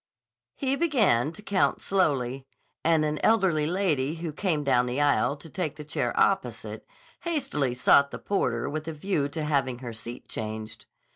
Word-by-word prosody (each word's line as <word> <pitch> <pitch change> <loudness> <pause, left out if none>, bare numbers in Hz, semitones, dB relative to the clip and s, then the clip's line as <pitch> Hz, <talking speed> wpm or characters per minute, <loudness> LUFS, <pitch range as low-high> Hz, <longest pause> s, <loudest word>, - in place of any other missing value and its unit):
He 270 0 0
began 220 - +2
to 210 - -13
count 200 -2 +1
slowly, 135 -8 0 0.4
and 160 -1 +3
an 150 0 -1
elderly 185 -9 +3
lady 160 -6 0
who 165 -2 -5
came 160 -3 0
down 125 -3 +3
the 125 +3 -2
aisle 145 -1 +3
to 145 +2 -13
take 160 -2 -3
the 150 - -8
chair 150 - -1
opposite - - 0 0.3
hastily 270 - -1
sought 140 +2 +5
the - - -6
porter 120 -12 -1
with 155 +2 -4
a 160 - -3
view 150 -3 -1
to 155 +2 -4
having 135 -4 0
her 120 -2 -7
seat 115 +2 -9
changed. 110 0 -6
150 Hz, 165 wpm, -27 LUFS, 130-185 Hz, 0.4 s, sought